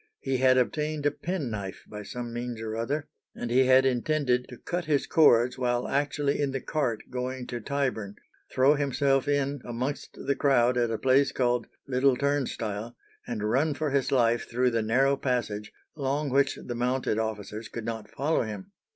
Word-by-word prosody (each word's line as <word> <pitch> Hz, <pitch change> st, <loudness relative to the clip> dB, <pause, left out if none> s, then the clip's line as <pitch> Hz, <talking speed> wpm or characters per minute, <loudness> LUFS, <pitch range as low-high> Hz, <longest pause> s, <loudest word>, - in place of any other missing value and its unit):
He 135 Hz, -, -1 dB
had 130 Hz, 0 st, +4 dB
obtained 150 Hz, +3 st, 0 dB
a 145 Hz, -, +4 dB
penknife 120 Hz, -, -4 dB
by 105 Hz, 0 st, -7 dB
some 120 Hz, +3 st, -6 dB
means 120 Hz, -1 st, -4 dB
or 110 Hz, -1 st, -4 dB
other, 140 Hz, +7 st, -2 dB, 0.3 s
and 120 Hz, -, -4 dB
he 130 Hz, +2 st, +5 dB
had 130 Hz, +1 st, +6 dB
intended 125 Hz, 0 st, +1 dB
to 125 Hz, -, -10 dB
cut 175 Hz, +5 st, -3 dB
his 150 Hz, -3 st, +1 dB
cords 125 Hz, -5 st, +4 dB
while 120 Hz, -1 st, 0 dB
actually 145 Hz, 0 st, 0 dB
in 140 Hz, -, +1 dB
the 135 Hz, -, -1 dB
cart 125 Hz, -7 st, -2 dB
going 125 Hz, 0 st, -3 dB
to 120 Hz, -1 st, -5 dB
Tyburn, 125 Hz, -6 st, -2 dB, 0.4 s
throw 135 Hz, +3 st, +5 dB
himself 140 Hz, -1 st, +1 dB
in 145 Hz, -1 st, 0 dB
amongst 125 Hz, +4 st, -4 dB
the 140 Hz, +1 st, +1 dB
crowd 125 Hz, -3 st, +3 dB
at 120 Hz, -1 st, +1 dB
a 115 Hz, -, -1 dB
place 135 Hz, +3 st, +3 dB
called 120 Hz, -2 st, 0 dB, 0.2 s
Little 130 Hz, 0 st, +3 dB
Turnstile, 120 Hz, -6 st, -2 dB, 0.3 s
and 105 Hz, -3 st, -2 dB
run 140 Hz, +6 st, +1 dB
for 150 Hz, 0 st, -1 dB
his 140 Hz, -1 st, +1 dB
life 120 Hz, -3 st, +2 dB
through 125 Hz, +1 st, +2 dB
the 115 Hz, -1 st, +1 dB
narrow 130 Hz, +6 st, +3 dB
passage, 110 Hz, -6 st, -2 dB, 0.2 s
along 140 Hz, 0 st, -1 dB
which 140 Hz, +1 st, +3 dB
the 120 Hz, -, -5 dB
mounted 125 Hz, -2 st, 0 dB
officers 110 Hz, 0 st, -4 dB
could 115 Hz, -2 st, -6 dB
not 110 Hz, -2 st, -5 dB
follow 150 Hz, +7 st, 0 dB
him. 105 Hz, -4 st, -6 dB
125 Hz, 175 wpm, -28 LUFS, 115-140 Hz, 0.4 s, had